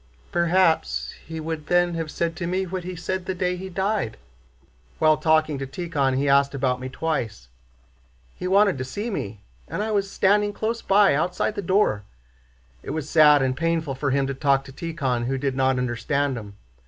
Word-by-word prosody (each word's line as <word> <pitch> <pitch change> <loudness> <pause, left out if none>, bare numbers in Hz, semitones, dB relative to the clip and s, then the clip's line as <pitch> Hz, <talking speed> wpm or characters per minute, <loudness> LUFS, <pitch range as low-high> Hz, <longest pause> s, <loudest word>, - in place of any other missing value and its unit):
"Perhaps 165 - +2
he 160 0 -5
would 155 -1 -5
then 175 0 +3
have 165 -2 -3
said 165 +2 -2
to 170 -1 -4
me 185 +2 0
what 185 0 -4
he 180 +1 -6
said 185 +2 -4
the 190 - -2
day 180 0 0
he 190 +1 -7
died. 190 - -1 0.8
While 155 -1 +4
talking 155 -3 +2
to 135 - -4
Tíkhon 140 -5 -1
he 140 +2 0
asked 140 0 +3
about 130 -2 0
me 130 +1 -5
twice. 125 - -3 0.8
He 180 - -5
wanted 195 -5 +3
to - - -1
see 205 - -4
me, 105 - -5 0.3
and 205 - -3
I 220 - -2
was 200 -2 0
standing 205 +2 +2
close 225 +2 -2
by, 200 -2 +4
outside 180 +8 0
the 205 - -4
door. 185 - +2 0.8
It - - -9
was 155 -1 -4
sad 150 -3 +6
and 130 -1 0
painful 165 -1 -1
for 140 +2 -2
him 135 0 +1
to 135 - -2
talk 135 0 +2
to 135 - -12
Tíkhon 135 -7 -2
who 135 +1 -1
did 135 0 -1
not 130 -1 +2
understand 125 +3 -1
him. 100 -3 -9
155 Hz, 190 wpm, -24 LUFS, 135-185 Hz, 0.8 s, sad